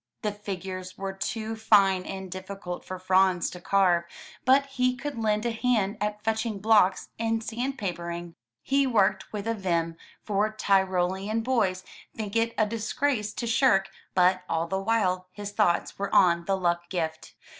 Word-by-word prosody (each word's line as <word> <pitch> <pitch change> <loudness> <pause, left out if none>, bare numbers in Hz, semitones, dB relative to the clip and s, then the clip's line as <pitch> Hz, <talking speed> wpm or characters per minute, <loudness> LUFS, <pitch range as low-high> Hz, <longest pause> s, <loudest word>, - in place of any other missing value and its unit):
The 210 - 0
figures 190 -2 -6
were 195 0 -4
too 220 +3 -3
fine 195 -4 +4
and 190 -1 -6
difficult 185 -1 -6
for 185 - -6
Franz 185 -1 +2
to 180 - -9
carve, 180 -3 +3 0.4
but 270 +2 +5
he 255 -2 0
could 280 +3 -5
lend 215 0 0
a 235 - +1
hand 225 -3 0
at 210 0 -2
fetching 220 -1 -1
blocks 205 -2 +3
and 225 0 0
sandpapering. 180 -9 -4 0.3
He 275 0 +2
worked 195 -5 +2
with 210 0 -5
a 230 - +1
vim, 170 -5 -1 0.3
for 210 +1 0
Tyrolean 190 +1 +1
boys 200 -7 +1 0.3
think 215 -1 -5
it 230 0 +1
a 215 - +4
disgrace 225 +1 -1
to 240 - -4
shirk, 215 -5 +3 0.3
but 185 0 +4
all 165 0 0
the 190 +3 -2
while 190 -4 +1
his 205 -1 -6
thoughts 205 -5 +1
were 200 - -1
on 170 -2 +5
the 195 +1 +1
luck 175 -1 -1
gift. 160 -3 -4
200 Hz, 160 wpm, -27 LUFS, 185-225 Hz, 0.4 s, but